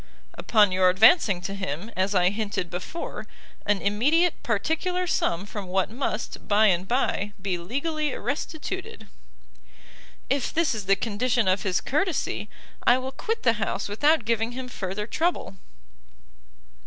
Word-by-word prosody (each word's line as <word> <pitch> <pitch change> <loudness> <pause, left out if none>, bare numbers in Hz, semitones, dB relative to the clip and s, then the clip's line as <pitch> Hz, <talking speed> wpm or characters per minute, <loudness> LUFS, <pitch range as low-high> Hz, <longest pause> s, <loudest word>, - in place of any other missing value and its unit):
"Upon 210 -4 +3
your 185 0 +4
advancing 200 - +5
to 195 - -4
him, 190 +1 -4
as 190 +2 0
I 180 0 +4
hinted 205 -4 -3
before, 180 - -6 0.4
an 205 -2 +1
immediate 295 - +2
particular 320 - -1
sum 185 - 0
from 205 -2 -7
what 190 +2 0
must, 250 +5 -4
by 210 +1 +4
and 185 -2 +2
bye, 210 -4 0
be 190 -1 -1
legally 295 - -2
restituted." 375 +8 -5 1.2
"If 275 -2 0
this 330 -4 +1
is 210 -4 -5
the 195 - +5
condition 225 +2 0
of 185 +2 +2
his 185 -2 0
courtesy, 290 - -1 0.3
I 245 - +5
will 260 +1 -4
quit 450 +10 -3
the 230 - +4
house 200 0 -2
without 290 +6 +2
giving 230 +1 0
him 255 0 -6
further 195 -2 -4
trouble." 320 - -1
215 Hz, 140 wpm, -25 LUFS, 195-285 Hz, 1.2 s, advancing